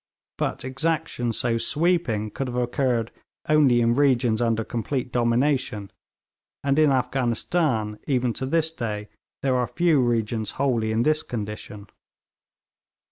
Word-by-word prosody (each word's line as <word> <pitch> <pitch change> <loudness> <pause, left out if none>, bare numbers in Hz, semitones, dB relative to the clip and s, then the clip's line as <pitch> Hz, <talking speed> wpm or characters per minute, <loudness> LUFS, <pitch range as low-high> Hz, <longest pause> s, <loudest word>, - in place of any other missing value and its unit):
But - - -2
exaction 135 -3 -1
so 115 0 0
sweeping 145 -10 0
could 135 - -4
have 125 - -5
occurred 120 -2 0 0.4
only 145 -6 +4
in 115 0 +3
regions 125 -4 +2
under 115 -1 +1
complete 125 +3 -3
domination; 120 -3 0 0.7
and 140 +1 +2
in 155 -1 +5
Afghanistan, 125 -2 0
even 125 -3 +1
to 130 - -3
this 160 +2 +1
day, 105 -8 -4 0.3
there 135 -2 +2
are 125 -1 +1
few 170 -5 +2
regions 115 -2 -1
wholly 120 -5 +1
in 110 +2 +1
this 155 +2 +2
condition. 105 -2 -6
125 Hz, 130 wpm, -24 LUFS, 115-140 Hz, 0.7 s, in